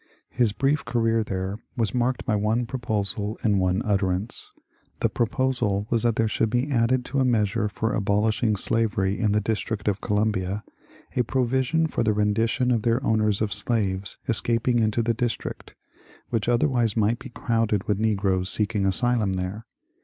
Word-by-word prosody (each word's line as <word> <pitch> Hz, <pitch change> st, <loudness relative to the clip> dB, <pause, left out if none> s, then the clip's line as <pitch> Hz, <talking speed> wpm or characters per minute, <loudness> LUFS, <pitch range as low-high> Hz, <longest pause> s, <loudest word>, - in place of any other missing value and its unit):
His 120 Hz, -3 st, +2 dB
brief 140 Hz, +7 st, 0 dB
career 115 Hz, -1 st, +1 dB
there 95 Hz, 0 st, -4 dB, 0.2 s
was 110 Hz, -5 st, 0 dB
marked 125 Hz, +1 st, 0 dB
by 110 Hz, -, +1 dB
one 110 Hz, +4 st, +1 dB
proposal 110 Hz, -3 st, -1 dB
and 105 Hz, -3 st, +3 dB
one 95 Hz, +3 st, +1 dB
utterance. 100 Hz, 0 st, -1 dB, 0.5 s
The -, -, +1 dB
proposal 120 Hz, -4 st, 0 dB
was 115 Hz, -2 st, +2 dB
that 115 Hz, -1 st, +1 dB
there 115 Hz, -1 st, +2 dB
should 110 Hz, +1 st, 0 dB
be 125 Hz, +5 st, 0 dB
added 125 Hz, 0 st, +2 dB
to 140 Hz, -, -2 dB
a -, -, +3 dB
measure 110 Hz, -3 st, +1 dB
for 110 Hz, +2 st, -2 dB
abolishing 105 Hz, +2 st, +1 dB
slavery 100 Hz, -2 st, 0 dB
in 105 Hz, -2 st, +1 dB
the 105 Hz, -, +3 dB
District 105 Hz, 0 st, -3 dB
of 105 Hz, -1 st, 0 dB
Columbia 105 Hz, -1 st, -1 dB, 0.5 s
a 125 Hz, -, +3 dB
provision 130 Hz, +6 st, +1 dB
for 160 Hz, -, -2 dB
the 110 Hz, -2 st, +2 dB
rendition 110 Hz, +4 st, +1 dB
to 120 Hz, -2 st, +3 dB
their 115 Hz, +4 st, 0 dB
owners 110 Hz, -1 st, +2 dB
of 105 Hz, -3 st, -1 dB
slaves 100 Hz, -2 st, +1 dB
escaping 120 Hz, +2 st, +2 dB
into 110 Hz, +1 st, +1 dB
the 115 Hz, +1 st, +1 dB
Dis 120 Hz, +1 st, -1 dB
trict, -, -, -8 dB, 0.6 s
which 115 Hz, -1 st, 0 dB
otherwise 120 Hz, -3 st, +1 dB
might 110 Hz, +2 st, +2 dB
be 130 Hz, 0 st, -9 dB
crowded 115 Hz, -4 st, -1 dB
with 105 Hz, -1 st, 0 dB
negroes 95 Hz, -4 st, +1 dB
seeking 105 Hz, -1 st, 0 dB
asylum 110 Hz, 0 st, +1 dB
there. 95 Hz, +4 st, -4 dB
110 Hz, 170 wpm, -25 LUFS, 105-120 Hz, 0.6 s, and